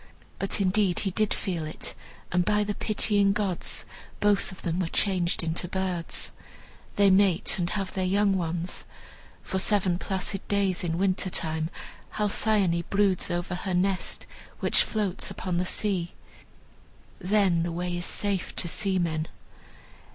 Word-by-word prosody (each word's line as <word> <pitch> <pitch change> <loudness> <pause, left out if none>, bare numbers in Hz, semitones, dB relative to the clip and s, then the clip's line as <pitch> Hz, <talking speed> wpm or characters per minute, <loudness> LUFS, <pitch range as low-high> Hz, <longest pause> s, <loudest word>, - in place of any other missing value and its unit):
But 195 - -1
indeed 190 -1 +2
he 195 - -1
did 215 +2 +1
feel 175 -4 -2
it, 155 0 -6 0.4
and 180 0 +3
by 210 +2 +2
the 205 0 -2
pitying 205 -1 +3
gods 200 -4 -1 0.3
both 205 -1 +2
of 185 - -12
them 170 +1 -1
were 180 - 0
changed 180 -1 +1
into 165 +2 -1
birds. 185 -2 0 0.6
They 200 -1 +5
mate 190 -1 +3
and 175 -1 0
have 195 -1 -2
their 190 - -1
young 200 +1 +3
ones. 170 0 -2 0.6
For 190 - -2
seven 190 -3 +2
placid 190 0 -3
days, 200 -2 +1
in 165 -1 -1
winter 190 0 +1
time, 160 -2 -1 0.5
Halcyone 205 -4 +2
broods 200 -2 +2
over 175 +1 -2
her 180 +1 -2
nest, 185 +1 0 0.3
which - - +4
floats 205 -4 -1
upon 180 -2 -3
the 180 - +1
sea. 185 -3 -1 1.0
Then 190 -3 +3
the 170 +1 -1
way 175 +1 -2
is 175 0 -3
safe 200 -3 -1
to 175 - -2
seamen. 170 -4 0
185 Hz, 145 wpm, -27 LUFS, 175-200 Hz, 1.0 s, They